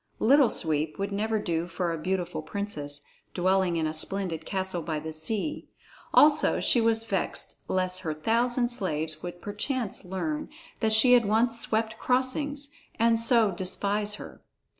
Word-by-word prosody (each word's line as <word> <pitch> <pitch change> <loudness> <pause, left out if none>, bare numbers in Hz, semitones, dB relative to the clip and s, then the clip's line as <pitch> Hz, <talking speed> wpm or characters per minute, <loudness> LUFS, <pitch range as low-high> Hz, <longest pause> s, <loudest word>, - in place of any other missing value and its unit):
"Little 270 +1 +5
Sweep" 155 -1 0
would 200 +1 -3
never 215 +2 0
do 170 -4 -2
for 175 0 -2
a - - -3
beautiful 180 -1 -2
princess, 155 -7 -4 0.3
dwelling 185 -1 +2
in 160 - 0
a 155 - -2
splendid 165 -1 -2
castle 190 -2 -2
by 155 -1 -3
the 160 +1 -6
sea; 210 - -2 0.4
also 300 0 +5
she 240 - +3
was 225 0 +2
vexed 200 -4 -3
lest 185 0 0
her 160 -4 -4
thousand 240 +8 +1
slaves 160 -10 -2
should 175 0 -8
perchance 210 +2 -3
learn 300 - -4 0.3
that 220 -1 +1
she 245 +3 +6
had 240 -2 +5
once 230 +3 +2
swept 220 0 -1
crossings, 280 +3 0 0.3
and 230 0 +3
so 230 -2 +4
despise 200 +3 -1
her. - - -11
200 Hz, 155 wpm, -27 LUFS, 175-230 Hz, 0.4 s, she